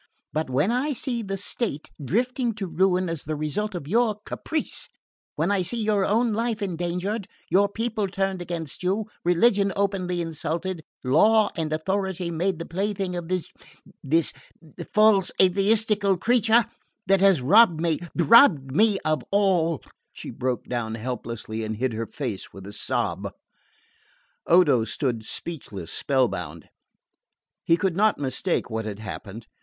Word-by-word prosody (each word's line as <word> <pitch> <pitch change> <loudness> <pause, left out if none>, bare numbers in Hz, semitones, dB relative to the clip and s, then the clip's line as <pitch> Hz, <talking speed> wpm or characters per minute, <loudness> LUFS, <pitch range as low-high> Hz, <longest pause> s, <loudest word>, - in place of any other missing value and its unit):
"But 155 -2 -1
when 145 - +1
I 270 +5 0
see 245 -2 -3
the 195 -2 -4
state 200 - -2
drifting 240 - 0
to 200 -2 -4
ruin 185 +1 +1
as 165 -3 -4
the 155 +1 -3
result 180 +8 -2
of 145 -5 -6
your 225 +3 +2
caprice, 315 -1 -2 0.5
when - - 0
I 200 -2 +2
see 185 +7 -3
your 210 -3 +1
own 225 +2 +2
life 225 0 -1
endangered, 180 +2 -3 0.2
your 200 +3 +4
people 220 -1 -2
turned 195 -1 -2
against 170 -4 -5
you, 195 +4 0 0.2
religion 195 +3 +3
openly 190 -3 -1
insulted, 165 +2 -3 0.2
law 210 +11 +4
and 160 -2 -2
authority 185 +2 -2
made 175 +2 -1
the 165 - -6
plaything 190 +1 -2
of 175 -1 -5
this 185 -1 -3 0.5
this 160 +3 +2 0.6
false 215 -3 +4
atheistical 200 +1 +3
creature, 230 +2 +3 0.4
that 195 0 +4
has 195 -4 +5
robbed 185 - +6
me 165 -2 0 0.2
robbed 170 - +5
me 210 +1 +4
of 155 0 +1
all 180 -6 +2
" - - -53
She - - -8
broke 125 -1 -2
off 115 -2 -2
helplessly 115 -2 -5
and 110 0 -4
hid 130 0 -1
her 115 +1 -3
face 120 -9 -5
with 95 -1 -11
a 100 - -9
sob. - - -2 1.2
Odo 150 -9 +5
stood 115 0 -2
speechless, 110 - -7
spell 130 -3 +2
bound. - - -7 0.9
He 165 - +3
could 190 -2 0
not 215 +2 +3
mistake 140 +6 -1
what 110 -1 -4
had 105 -2 -5
happened. 105 +1 -8
180 Hz, 150 wpm, -25 LUFS, 150-205 Hz, 1.2 s, robbed